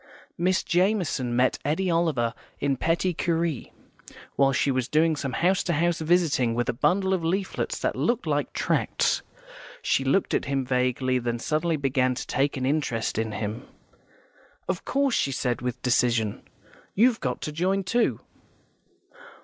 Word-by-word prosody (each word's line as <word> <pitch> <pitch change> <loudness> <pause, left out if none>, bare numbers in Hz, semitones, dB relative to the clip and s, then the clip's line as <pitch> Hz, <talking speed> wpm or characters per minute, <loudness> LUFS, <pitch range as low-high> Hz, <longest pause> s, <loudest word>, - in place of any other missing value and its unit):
Miss 185 +2 +1
Jamison 175 - +1
met 125 +1 +2
Eddy 175 +6 0
Oliver 155 -9 +1 0.3
in 140 -1 +1
Petty 165 +6 0
Cury, 165 -4 -1 0.6
while 135 -1 +4
she 135 +1 +1
was 130 -2 -1
doing 160 +2 +2
some 135 -3 -4
house 185 +2 +2
to 175 - -1
house 170 +2 +1
visiting 155 -8 +2
with 120 0 0
a - - +1
bundle 190 +9 +1
of 180 -3 -1
leaflets 190 +4 -1
that - - -1
looked - - 0
like - - -1
tracts. - - 0 0.6
She 135 - +1
looked 140 +9 +1
at - - +1
him 135 -1 -1
vaguely, 125 0 +1
then 120 -1 -2
suddenly 155 +6 0
began 130 -2 +1
to - - -5
take 140 0 0
an 130 - -2
interest 130 -7 -1
in 110 -1 -2
him. 105 +3 -4 1.0
"Of - - -3
course," 275 -2 +1
she 140 - +1
said, 125 -3 -1
with 125 0 -3
decision, 120 -4 +1 0.5
"you've 230 +3 +4
got 125 -5 -2
to 150 - -4
join, 185 +5 0
too." 230 +6 +1
145 Hz, 155 wpm, -26 LUFS, 125-175 Hz, 1.0 s, while